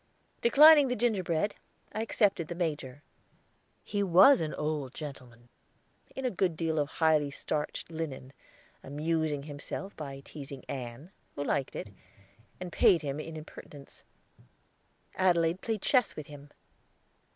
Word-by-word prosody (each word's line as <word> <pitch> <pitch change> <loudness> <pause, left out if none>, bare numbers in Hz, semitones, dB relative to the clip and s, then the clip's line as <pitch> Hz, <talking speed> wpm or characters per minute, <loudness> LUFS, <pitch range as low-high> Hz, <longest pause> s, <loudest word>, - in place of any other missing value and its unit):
Declining 295 +3 +8
the 250 - -1
gingerbread, 205 -5 0 0.4
I 215 - -2
accepted 205 -7 +1
the 175 - -5
Major. 150 -5 -3 0.8
He 205 - -2
was 200 +9 +6
an 155 -1 -2
old 150 -3 -3
gentleman, 125 -5 -9 0.7
in 265 - -4
a 250 - +1
good 180 -3 0
deal 160 -1 0
of 145 -1 0
highly 155 -3 +2
starched 150 +3 -4
linen, 145 -5 -6 0.5
amusing 150 0 -1
himself 150 +6 -7
by 140 -3 -7
teazing 140 -2 -9
Ann, 130 +6 -7 0.2
who 145 - -3
liked 140 -2 -1
it, 105 - -6 0.7
and 180 -1 -6
paid 170 -2 +4
him 140 0 -3
in 160 +1 -7
impertinence. 145 -2 -12 1.1
Adelaide 175 -1 +2
played 220 -3 -3
chess 250 -5 +2
with 155 - -7
him. 145 0 -12
160 Hz, 130 wpm, -30 LUFS, 145-185 Hz, 1.1 s, Declining